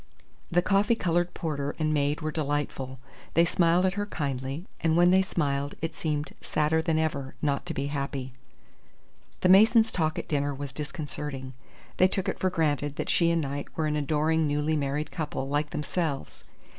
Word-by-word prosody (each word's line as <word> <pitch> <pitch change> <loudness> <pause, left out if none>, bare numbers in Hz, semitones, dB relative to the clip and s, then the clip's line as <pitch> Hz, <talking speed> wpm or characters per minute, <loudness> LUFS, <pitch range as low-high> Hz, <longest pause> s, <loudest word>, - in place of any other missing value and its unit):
The 175 +1 +2
coffee 205 +4 +3
coloured 175 -3 0
porter 145 -3 -3
and 155 -1 +1
maid 145 +1 +1
were 155 0 -2
delightful. 145 -3 -2 0.4
They 170 - +6
smiled 170 +1 +3
at 190 - +2
her 205 +1 -2
kindly, 140 -1 -3
and 165 0 +2
when 175 +1 +6
they 190 +1 +6
smiled 145 -6 -1
it 165 0 -3
seemed 150 -2 -2
sadder 155 +1 +1
than 160 0 +1
ever 140 -4 -1
not 140 -2 -1
to - - -2
be 140 - -1
happy. 140 -2 -3 1.1
The 185 - +3
Masons' 220 +4 +6
talk 155 -2 0
at - - -4
dinner 145 -1 0
was 140 -1 -6
disconcerting. 145 -3 -5 0.4
They 185 - +6
took 190 0 -2
it - - -2
for 185 - +2
granted 145 -4 0
that - - -1
she 170 -1 +3
and 170 -1 +2
Knight 140 +1 -4
were 160 - +1
an 150 0 0
adoring 155 +2 +1
newly 150 +2 +1
married 145 +1 -1
couple, 145 -5 -3
like 145 +2 0
themselves. 150 -1 -3
150 Hz, 180 wpm, -28 LUFS, 145-170 Hz, 1.1 s, They